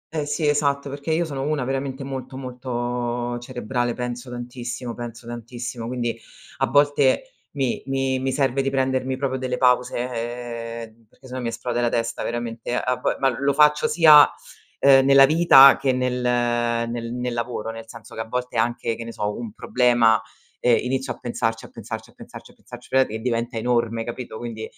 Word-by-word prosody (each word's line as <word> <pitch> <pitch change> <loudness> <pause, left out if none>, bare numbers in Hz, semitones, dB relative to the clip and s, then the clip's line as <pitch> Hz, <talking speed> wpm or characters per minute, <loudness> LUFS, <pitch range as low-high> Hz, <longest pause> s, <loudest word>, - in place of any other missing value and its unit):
Eh 150 -2 -1
sì, 150 +1 -1
esatto, 145 -1 +1
perché 140 +3 -4
io 170 +2 +1
sono 140 -4 -5
una 145 -1 -1
veramente 135 +1 -3
molto, 130 -1 -6
molto 120 -1 -3
cerebrale, 120 0 -3
penso 125 0 -5
tantissimo, 120 0 -6
penso 120 0 -8
tantissimo, 120 0 -6
quindi 120 -2 -2 0.4
a - - +1
volte 145 - +2 0.2
mi 135 -4 -1
mi 135 -1 0
mi 130 +1 -1
serve 135 0 +1
di 135 - 0
prendermi 130 -1 0
proprio 130 -1 -2
delle 125 -1 -2
pause, 125 -1 +2 0.9
ehm, 115 +1 -22
perché 130 - -22
se 125 - -10
no 130 - -4
mi 120 - -3
esplode 120 +1 -2
la 120 - +2
testa 115 0 -2
veramente, 120 0 -3
a 125 0 0
vo - - -1
ma 135 -2 +1
lo 140 0 +2
faccio 150 +1 +4
sia, 155 -3 +7 0.5
ehm, 135 -1 +6
nella 135 0 +7
vita 145 -3 +7
che 135 -1 +1
nel 125 0 -1
nel 120 -1 0
nel 125 0 -3
lavoro, 115 -1 -3
nel 115 0 -9
senso 115 -1 -12
che 110 - -4
a 110 - -6
volte 125 +1 -4
anche, 115 0 0
che 115 - -7
ne 115 - -7
so, 105 -1 -3
un 115 -3 -6
problema, 120 -3 +3 0.4
ehm, 120 -2 +4
inizio 130 0 -2
a - - -17
pensarci, 115 -2 -2
a - - -13
pensarci, - - -8
a - - -27
pensarci, - - -12
a - - -22
pensarci, 120 0 -13
ve 130 - +5
e 110 +1 -5
diventa 120 0 -2
enorme, 115 -1 0
capito, 120 -1 -7
quindi, 115 -2 -6
125 Hz, 185 wpm, -23 LUFS, 120-135 Hz, 0.9 s, sia